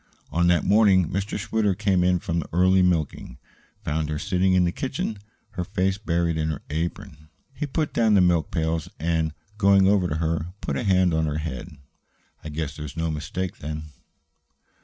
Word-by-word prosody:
On 85 +1 +2
that 85 -2 +3
morning 100 -4 +4
Mr. 100 +2 -2
Schwitter, 105 -1 0
coming 95 -3 +2
in 90 - +3
from 85 -3 -2
the 80 - -5
early 95 +2 +4
milking, 80 -8 0 0.5
found 80 -3 -1
her 75 - -2
sitting 95 +2 +1
in 90 -1 +4
the 85 - +1
kitchen, 120 -3 -3 0.3
her 90 - -3
face 95 +2 -1
buried 85 -4 0
in 80 0 0
her 75 -2 -4
apron. 75 -1 -4 0.2
He 150 +3 -4
put 150 +2 -2
down 110 -3 +3
the 95 - +6
milk 85 -4 +2
pails 80 -1 -1
and, 80 0 0 0.3
going 100 -2 +5
over 100 -2 +3
to 75 - -2
her, 80 +2 -2
put 70 - -3
a - - -1
hand 90 -3 +3
on 80 0 +1
her 75 0 -2
head. 75 +1 -6 0.7
"I 80 - -6
guess 75 -2 -4
there's 75 0 -8
no 80 0 -1
mistake, 85 +4 -4
then?" 75 0 -6
85 Hz, 185 wpm, -24 LUFS, 80-95 Hz, 0.7 s, the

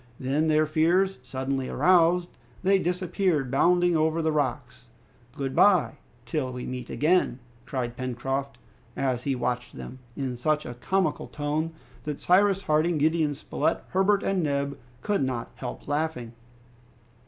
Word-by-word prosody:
Then 140 +5 0
their 155 0 +3
fears 170 +4 +2
suddenly 130 +1 -3
aroused, 175 -1 +3 0.3
they 195 +1 +4
disappeared, 180 -6 0
bounding 175 +4 +3
over 160 +1 +2
the 160 - +2
rocks. 130 -4 -2 0.5
"Good 135 -1 -3
bye, 180 -8 +4 0.3
till 130 0 -2
we 125 0 -6
meet 125 -1 -6
again," 155 -5 +2 0.3
cried 125 -3 -3
Pencroft, 135 +2 -3 0.4
as 130 -3 0
he 135 0 -1
watched 125 0 -3
them, 130 - -8 0.2
in 130 -3 -2
such 150 +4 0
a 120 - -5
comical 160 +6 -1
tone 150 +2 -2 0.3
that 150 -2 -4
Cyrus 195 +1 +3
Harding, 155 +2 +2
Gideon 155 0 +2
Spilett, 160 +3 -1
Herbert, 195 +2 +2
and 195 -2 +1
Neb 140 -2 -1 0.3
could 205 -1 +1
not 125 -3 -3
help 125 - -7
laughing. 145 -6 -2
150 Hz, 140 wpm, -26 LUFS, 130-175 Hz, 0.5 s, they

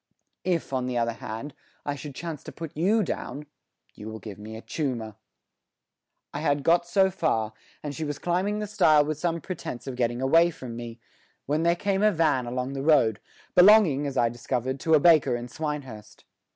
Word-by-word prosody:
If, 175 -6 -1
on 130 -1 -1
the 125 -1 -2
other 115 0 0
hand, 125 +4 -7 0.3
I 145 - -1
should 140 0 -8
chance 160 -2 -6
to - - -7
put 165 -2 -8
you 205 +8 +2
down, 150 -3 -5 0.5
you 105 - -9
will 110 - -6
give 105 -2 -9
me 110 +1 -8
a - - -9
choomer." 120 -8 -3 1.2
I 145 - -3
had 145 -2 0
got 170 +2 +3
so 190 +2 +3
far, 115 - 0 0.3
and 145 -1 -4
she 160 - -4
was 145 -2 -3
climbing 185 +6 0
the 210 - -2
stile 155 -8 +4
with 155 0 -3
some 170 0 -1
pretence 125 -9 -6
of 135 -2 -5
getting 120 -1 -1
away 165 +6 +4
from 130 -8 -8
me, 120 0 -8 0.5
when 150 +3 0
there 170 +1 +3
came 195 +2 -1
a 215 0 +5
van 155 -8 +1
along 125 +2 -3
the 135 - -4
road, 130 -8 +3 0.3
belonging, 180 -7 +6
as 135 -1 -4
I 120 - +4
discovered, 125 +2 -3
to 160 +3 +3
a - - +5
baker 150 -6 +5
in 120 0 -5
Swinehurst. 135 -7 -6
145 Hz, 195 wpm, -26 LUFS, 120-165 Hz, 1.2 s, belonging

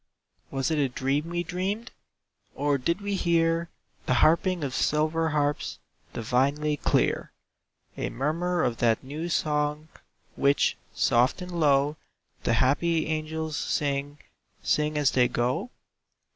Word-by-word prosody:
Was 135 +2 -1
it 155 - +1
a 140 -2 +2
dream 135 +5 -1
we 175 0 -1
dreamed, 195 +7 -3 0.6
Or 145 -1 +1
did 170 +9 -1
we 200 0 -2
hear 170 -2 +1 0.4
The 130 - +3
harping 170 - +3
of 135 -3 -3
silver 155 +3 +1
harps, 145 -1 -1 0.3
Divinely 140 +6 0
clear? - - +1 0.6
A - - -3
murmur 170 +7 -1
of 120 -2 0
that 115 0 +2
"new 150 +6 -5
song," 150 -1 0 0.5
Which, 140 +1 +2 0.2
soft 120 +7 +3
and 180 - -8
low, 145 -3 +2 0.5
The - - +2
happy 155 +7 +2
angels 155 0 -3
sing, 145 -2 -1 0.5
Sing 150 0 +1
as 145 -2 +3
they 125 -1 +4
go? 125 - -1
150 Hz, 130 wpm, -27 LUFS, 140-165 Hz, 0.6 s, they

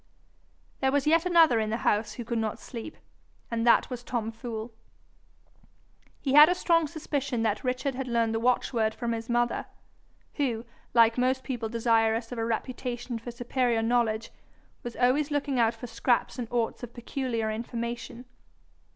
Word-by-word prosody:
There 265 0 +2
was 285 -1 +1
yet 330 +3 +3
another 330 -9 +5
in 215 -1 -1
the 225 - -1
house 210 +1 +1
who 240 - -7
could 235 0 -1
not 220 -1 -2
sleep, 240 +5 -8 0.5
and 230 0 0
that 235 - +4
was 245 -1 -5
Tom 230 -3 -2
Fool. 225 -1 -6 1.5
He 270 - -1
had 300 +2 +9
a 360 - +2
strong 330 -3 +2
suspicion 280 -6 -2
that 215 -1 0
Richard 255 +2 -1
had 260 +1 -4
learned 230 -2 +1
the 225 - 0
watchword 230 -2 +1
from 235 -1 -2
his 230 0 -4
mother, 240 0 0 0.7
who, 240 -6 -1 0.3
like 230 0 +5
most 260 +1 +1
people 240 -4 -3
desirous 225 0 +1
of 245 - -4
a 225 - 0
reputation 240 +1 -3
for 230 - -8
superior 240 -1 0
knowledge, 225 -2 +1 0.5
was 240 -1 -7
always 265 +4 +2
looking 285 -3 -1
out 230 0 +3
for - - -8
scraps 245 +2 0
and 240 - -3
orts 235 -2 -1
of 240 -1 -9
peculiar 240 -3 -2
information. 235 +2 -5
240 Hz, 165 wpm, -28 LUFS, 225-260 Hz, 1.5 s, had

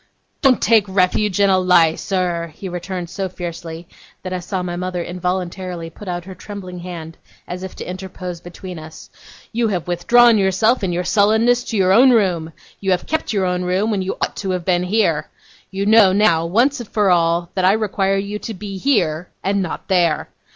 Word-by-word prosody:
'Don't 265 -4 +3
take 225 -3 +5
refuge 190 +1 +1
in 200 - +5
a 190 - +4
lie, 175 -3 +4
sir!' 175 -3 -2
he 195 - -7
returned 180 0 -5
so 190 +1 -4
fiercely, 170 -2 -7 0.4
that 185 0 -4
I 185 - -2
saw 180 +1 -3
my 175 -1 -4
mother 180 -1 -3
involuntarily 180 -1 -4
put 205 - -12
out 175 -1 -4
her 190 - -8
trembling 185 -2 -8
hand 170 -2 -8 0.3
as 180 +1 -6
if 190 0 -7
to - - -7
interpose 180 -1 -7
between 175 0 -9
us. 155 0 -12 0.4
'You 235 0 0
have 180 -6 -2
withdrawn 225 +6 +5
yourself 200 +5 +2
in 185 - 0
your 175 +1 -1
sullenness 220 +6 +3
to 225 - -3
your 190 -1 +4
own 250 +6 +7
room. 180 -9 +2 0.3
You 195 - -3
have 180 -1 +1
kept 315 +1 -2
your 200 -3 0
own 180 0 -1
room 185 +5 0
when 200 -3 0
you 185 - -3
ought - - -2
to 195 - -4
have 175 - -11
been 175 -2 +2
here. 185 -6 +1 0.4
You 195 +1 -3
know 215 -2 +6
now, 170 -5 +3
once 245 - +2
for 205 -3 +2
all, 170 0 +2
that 185 - -1
I 185 +2 +5
require 195 -2 0
you 200 +1 -3
to 225 - -6
be 195 0 -7
here, 175 - +1
and 195 +1 +1
not 180 - -5
there. 175 -4 +1
185 Hz, 200 wpm, -19 LUFS, 175-205 Hz, 0.4 s, own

